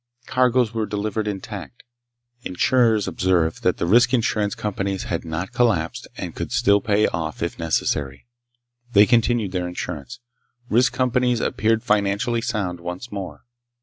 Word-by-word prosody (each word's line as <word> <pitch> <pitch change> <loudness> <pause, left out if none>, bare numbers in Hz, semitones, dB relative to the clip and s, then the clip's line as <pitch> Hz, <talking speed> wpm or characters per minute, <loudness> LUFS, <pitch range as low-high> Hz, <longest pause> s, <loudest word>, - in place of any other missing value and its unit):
Cargoes 125 -2 +2
were 110 -2 -1
delivered 105 +1 -2
intact. 95 -9 -6 0.6
Insurers 110 +2 +2
observed 90 -3 +1
that - - +1
the - - -1
risk 120 +7 +5
insurance 105 -3 0
companies 100 -2 -3
had 85 - -3
not 85 +3 -4
collapsed 95 -10 0
and - - -5
could - - -5
still 100 0 +3
pay 105 0 +2
off 80 -1 -3
if 85 - -4
necessary. 70 -4 -1 0.7
They 105 +1 +7
continued 115 -3 +2
their 90 -1 -2
insurance. 75 -7 -6 0.5
Risk 120 +4 +3
companies 125 -1 +1
appeared 110 +2 +1
financially 105 +3 +1
sound 90 -6 -2
once 90 +7 -7
more. 100 -2 -6
105 Hz, 140 wpm, -22 LUFS, 90-115 Hz, 0.7 s, They